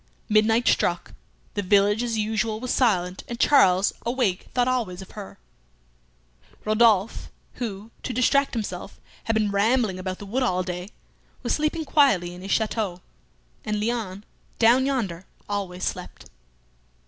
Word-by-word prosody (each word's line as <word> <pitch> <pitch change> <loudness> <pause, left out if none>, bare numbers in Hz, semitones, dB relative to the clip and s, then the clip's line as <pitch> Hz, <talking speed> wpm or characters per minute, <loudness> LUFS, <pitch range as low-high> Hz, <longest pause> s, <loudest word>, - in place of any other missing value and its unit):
Midnight 225 +3 +3
struck. 175 0 +1 0.4
The 205 - -1
village 205 +3 +3
as 235 -2 -1
usual 220 0 -1
was 255 +1 -2
silent, 185 -7 +1
and 235 -1 -6
Charles, 190 -9 +4
awake, 235 -6 -1
thought 245 -1 +1
always 215 -8 -1
of - - -15
her. 205 -2 -9 1.3
Rodolphe, 215 -1 +3 0.3
who, 215 -1 -5
to - - -4
distract 265 +3 +2
himself, 195 -3 -5 0.3
had 225 - 0
been 215 -2 +1
rambling 210 -1 +1
about 185 0 -4
the 205 - -9
wood 235 +7 -2
all 185 -7 +1
day, 180 +1 -5 0.5
was - - 0
sleeping 305 +1 -1
quietly 195 - +3
in 180 - -10
his 195 - -8
château, 210 -4 -1 0.6
and 210 0 -2
Léon, 210 -3 -2 0.3
down 245 +4 +4
yonder, 195 -10 -2 0.2
always 195 -3 -4
slept. - - -5
215 Hz, 140 wpm, -24 LUFS, 190-240 Hz, 1.3 s, Charles